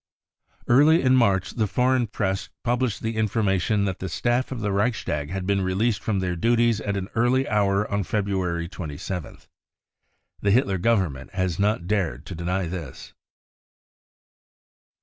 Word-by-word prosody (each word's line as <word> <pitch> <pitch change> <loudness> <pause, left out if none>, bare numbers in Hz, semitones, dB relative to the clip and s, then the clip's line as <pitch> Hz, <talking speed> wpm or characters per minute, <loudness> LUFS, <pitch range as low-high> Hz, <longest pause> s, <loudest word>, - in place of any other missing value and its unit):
Early 150 +7 +5
in 130 0 +4
March 100 -7 +2
the 110 -4 0
foreign 125 +3 +2
Press 95 -2 -2
published 120 -2 0
the 110 0 -2
informa 105 -3 +1
tion 100 +3 +1
that 95 -2 -3
the 95 - -4
staff 120 +9 0
of 130 - -4
the 105 -1 -1
Reichstag 100 -9 -1
had 95 +1 -4
been 100 0 +1
released 100 +4 0
from 110 -3 -1
their 95 -2 -1
duties 115 +3 +2
at 100 -1 -2
an 95 -1 -3
early 125 +3 +2
hour 100 -1 +1
on 100 0 -1
February 95 -4 -1
27th. 85 -1 -6 1.0
Xhc 100 - +2
Hitler 100 -6 +2
Government 90 - 0
has 95 -2 -1
not 100 -3 +1
dared 100 -3 -1
to - - -7
deny 90 +3 -2
this. 80 -6 -7
100 Hz, 150 wpm, -24 LUFS, 95-115 Hz, 1.0 s, Early